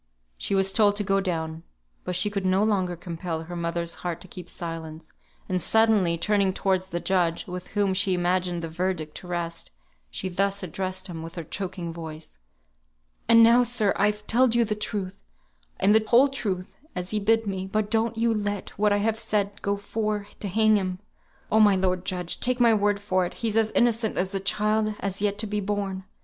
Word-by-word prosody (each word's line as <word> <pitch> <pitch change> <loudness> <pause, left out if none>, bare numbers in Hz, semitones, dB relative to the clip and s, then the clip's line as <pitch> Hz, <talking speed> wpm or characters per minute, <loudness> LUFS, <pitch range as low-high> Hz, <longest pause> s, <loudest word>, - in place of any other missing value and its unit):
She 195 - -2
was 195 0 +2
told 205 -2 +4
to 205 - -1
go 195 0 +2
down. 160 -4 -3 0.4
But 180 - -2
she 185 +4 +1
could 200 -1 -2
no 190 +2 +2
longer 190 -5 +1
compel 165 -1 -5
her 175 +2 -8
mother's 170 0 -2
heart 175 -2 -3
to - - -11
keep 180 -1 -9
silence, 160 -2 -7 0.3
and 185 -1 -1
suddenly 215 -6 +3
turning 200 +1 +1
towards 190 -1 0
the 175 -2 -3
judge 170 -1 0
(with 180 0 -7
whom 200 -2 +2
she 185 0 +1
imagined 180 -1 0
the - - -2
verdict 165 -2 -3
to 180 - -10
rest), 170 -1 -4 0.4
she 125 - -4
thus 195 +2 0
addressed 185 +2 -4
him 170 -4 -6
with 165 +1 -8
her 170 - -4
choking 175 0 -5
voice. 160 - -9 0.9
"And 230 0 +8
now, 235 +2 +7
sir, 230 -4 +2
I've 210 +1 +1
telled 240 +1 +3
you 235 -1 +4
the 210 - -1
truth, 205 -3 -4 0.6
and 205 - +5
the 220 0 +5
whole 250 +5 +6
truth, 195 -9 -4 0.2
as 180 0 -4
he 215 - 0
bid 225 +2 +2
me; 190 -1 -3
but 210 +1 -1
don't 225 0 +1
ye 230 +1 +2
let 205 -3 -1
what 210 0 +3
I 205 - +3
have 225 0 0
said 205 -3 -1
go 200 0 0
for 210 0 -2
to 205 - -4
hang 215 +2 +4
him; 185 -2 -2 0.5
oh, 220 - +4
my 205 -2 +6
lord 185 -1 0
judge, 180 -2 -3
take 250 0 +1
my 235 -2 +6
word 205 -1 +2
for 185 -2 +1
it, - - -11
he's 225 -2 -2
as 225 -1 +3
innocent 230 -2 +2
as 185 +1 0
the 195 - -1
child 215 +2 +1
as 215 - -3
has 200 0 -4
yet 205 -1 0
to 215 - -1
be 210 0 -2
born. 195 -2 -3
195 Hz, 205 wpm, -26 LUFS, 180-210 Hz, 0.9 s, And